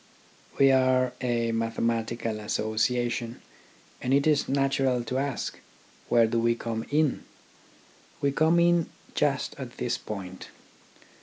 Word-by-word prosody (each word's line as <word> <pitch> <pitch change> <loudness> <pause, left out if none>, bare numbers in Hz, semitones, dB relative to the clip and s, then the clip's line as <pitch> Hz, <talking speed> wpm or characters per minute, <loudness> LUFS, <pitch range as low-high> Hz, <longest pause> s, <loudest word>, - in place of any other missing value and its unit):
We 135 -1 +6
are 130 -1 +3
a 120 -2 0
Mathematical 115 0 -1
Association, 115 +3 -1 0.6
and 130 +2 +2
it 140 - +2
is 150 -2 +2
natural 135 -2 +1
to 130 +3 -2
ask: 140 -2 -3 0.5
Where 120 -1 +5
do 115 +1 0
we 115 0 +2
come 115 -1 -4
in? 150 -2 +1 1.0
We 140 - +1
come 160 +4 +3
in 170 -1 +3 0.3
just - - 0
at - - -8
this - - -1
point. 95 -3 -7
120 Hz, 125 wpm, -27 LUFS, 115-135 Hz, 1.0 s, We